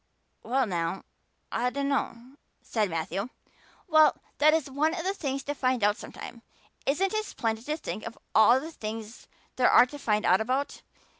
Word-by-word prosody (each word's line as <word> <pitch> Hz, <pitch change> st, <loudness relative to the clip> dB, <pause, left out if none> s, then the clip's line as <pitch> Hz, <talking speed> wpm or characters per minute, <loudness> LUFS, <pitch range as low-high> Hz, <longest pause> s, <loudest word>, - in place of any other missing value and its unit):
"Well 260 Hz, +2 st, +1 dB
now, 170 Hz, -2 st, -2 dB, 0.5 s
I 245 Hz, +2 st, +1 dB
dunno," 275 Hz, -2 st, -2 dB, 0.3 s
said 215 Hz, -4 st, 0 dB
Matthew. 180 Hz, +7 st, -3 dB, 0.6 s
"Well, 310 Hz, -2 st, +5 dB, 0.2 s
that 305 Hz, +1 st, +6 dB
is 320 Hz, -3 st, +1 dB
one 300 Hz, +5 st, 0 dB
of 335 Hz, -, -4 dB
the 385 Hz, +2 st, 0 dB
things 275 Hz, -7 st, -3 dB
to 290 Hz, -, -3 dB
find 255 Hz, -5 st, 0 dB
out 205 Hz, 0 st, +4 dB
sometime. 235 Hz, -, -9 dB, 0.5 s
Isn't 375 Hz, +9 st, +1 dB
it 435 Hz, 0 st, 0 dB
splendid 225 Hz, -, -3 dB
to 305 Hz, +1 st, -1 dB
think 215 Hz, -8 st, -5 dB
of 230 Hz, -, -9 dB, 0.2 s
all 235 Hz, +4 st, +6 dB
the 315 Hz, +4 st, -7 dB
things 220 Hz, -3 st, -7 dB, 0.3 s
there 250 Hz, -, +5 dB
are -, -, +7 dB
to 290 Hz, +3 st, -10 dB
find 210 Hz, -4 st, 0 dB
out 185 Hz, +4 st, +4 dB
about? 260 Hz, +5 st, -2 dB
255 Hz, 170 wpm, -28 LUFS, 220-290 Hz, 0.6 s, are